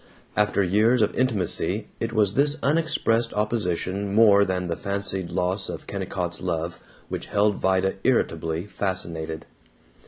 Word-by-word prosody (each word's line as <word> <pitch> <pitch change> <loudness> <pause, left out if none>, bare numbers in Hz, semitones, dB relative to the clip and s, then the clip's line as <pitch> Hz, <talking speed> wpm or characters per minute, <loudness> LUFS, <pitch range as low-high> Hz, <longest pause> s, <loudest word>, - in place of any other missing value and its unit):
After 105 -1 +2
years 110 +6 +3
of 105 - 0
intimacy 110 -9 0
it 115 - -2
was 105 -3 +2
this 145 +4 +2
unexpressed 140 -7 +1
opposition 100 -2 -1
more 105 -2 +6
than 95 -2 -1
the 85 -1 -2
fancied 100 -1 -2
loss 90 +2 -1
of - - -6
Kennicott's 90 -1 -4
love 85 -2 -3 0.3
which - - -5
held 105 0 +2
Vida 95 0 +1
irritably 80 -8 0
fascinated. 85 -6 -3
100 Hz, 130 wpm, -24 LUFS, 90-110 Hz, 0.3 s, more